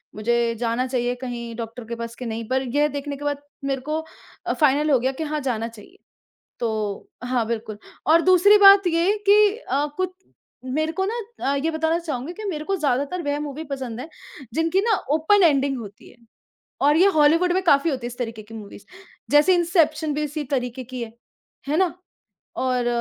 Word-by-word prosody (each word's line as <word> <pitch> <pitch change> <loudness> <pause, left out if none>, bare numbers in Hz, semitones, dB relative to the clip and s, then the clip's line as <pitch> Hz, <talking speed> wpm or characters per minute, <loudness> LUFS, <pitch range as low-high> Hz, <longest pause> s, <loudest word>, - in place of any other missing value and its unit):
मुझे 235 +2 0
जाना 235 +1 0
चाहिए, 245 -1 -1
कहीं 240 -2 -6
डॉक्टर 230 +1 -7
के 235 +1 -5
पास 230 0 -6
कि 250 - -7
नहीं? 225 -1 -4
पर 260 0 +1
यह 295 +1 +4
देखने 285 0 -5
के 290 - -8
बाद 285 -1 -2 0.2
मेरे 270 -1 -1
को 305 +4 -2 0.5
अ, - - 0
फ़ाइनल 300 0 +2
हो 265 - +5
गया 260 +3 0
कि 270 +4 -5
हाँ 305 0 -2
जाना 225 -2 -2
चाहिए, 230 - -14 0.6
तो 215 -3 -3
हाँ 245 -2 0
बिल्कुल 220 -2 -4 0.3
और 325 +2 +6
दूसरी 370 +4 +6
बात 395 -1 +8
ये 350 +5 +2
कि 405 - +8 0.2
अ, 290 - -1
कु 370 - +1 0.6
मेरे 310 +5 -1
को 380 +3 -1
ना 435 +4 -2 0.4
अ, - - 0
ये 300 +4 -1
बताना 320 +1 0
चाहूँगी 305 -2 -5
कि 430 +3 -8
मेरे 305 -4 -4
को 390 - 0
ज़्यादातर 285 +2 -1
वह 290 0 -1
मूवी 295 +1 -5
पसंद 250 -4 -5
हैं 280 +6 -7 0.4
जिनकी 325 +5 +1
ना 440 - +4 0.2
ओपन 375 +6 +4
एंडिंग 280 -4 +3
होती 210 +1 -11
है - - -19 0.6
और 295 +2 +4
ये 370 +4 +6
हॉलीवुड 325 +4 +4
में 375 - +1
काफ़ी 285 -2 +4
होती 255 -5 -3
है - - -2
इस 245 - -11
तरीके 225 -3 -4
की 215 +2 -14
मूवीज़ 205 -2 -10 0.5
जैसे 295 +5 +6
इन्सेप्शन 320 -3 +1
भी 300 +1 -1
उसी 300 +1 -4
तरीके 250 -1 -2
की 250 0 -7
है। 225 -1 -9 0.6
है 300 - +1
ना, 370 -1 +2 0.6
और 250 -2 0
280 Hz, 200 wpm, -23 LUFS, 245-320 Hz, 0.6 s, बात